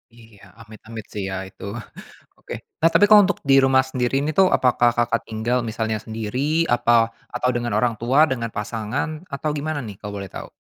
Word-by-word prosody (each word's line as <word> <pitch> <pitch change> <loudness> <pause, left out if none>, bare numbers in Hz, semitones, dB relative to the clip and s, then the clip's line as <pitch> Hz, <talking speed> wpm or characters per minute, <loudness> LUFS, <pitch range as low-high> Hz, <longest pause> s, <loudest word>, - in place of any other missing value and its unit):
Iya, 115 -3 -18 0.2
amit-amit 110 0 -10
sih 105 - -4
ya 95 - -4
itu. - - -15 0.7
Oke. - - -9 0.3
Nah, 165 - +5
tapi 205 - +6
kalau 210 -1 +9
untuk 200 - -1
di 135 - +7
rumah 135 0 +5
sendiri 130 -1 -2
ini 150 - -1
tuh 190 -1 +6
apakah 120 -1 +3
Kakak 120 0 +1
tinggal 115 +3 -1
misalnya 110 0 -2
sendiri, 125 +9 -1
apa 120 0 +3 0.4
atau 125 - 0
dengan 120 0 -2
orang 120 -1 +2
tua, 125 +5 +2
dengan 115 -3 -2
pasangan, 120 - -4
atau 140 +2 -2
gimana 155 +1 -3
nih 105 - -8
kalau 105 0 -8
boleh 95 - -7
tahu? - - -9
120 Hz, 185 wpm, -22 LUFS, 110-140 Hz, 0.7 s, kalau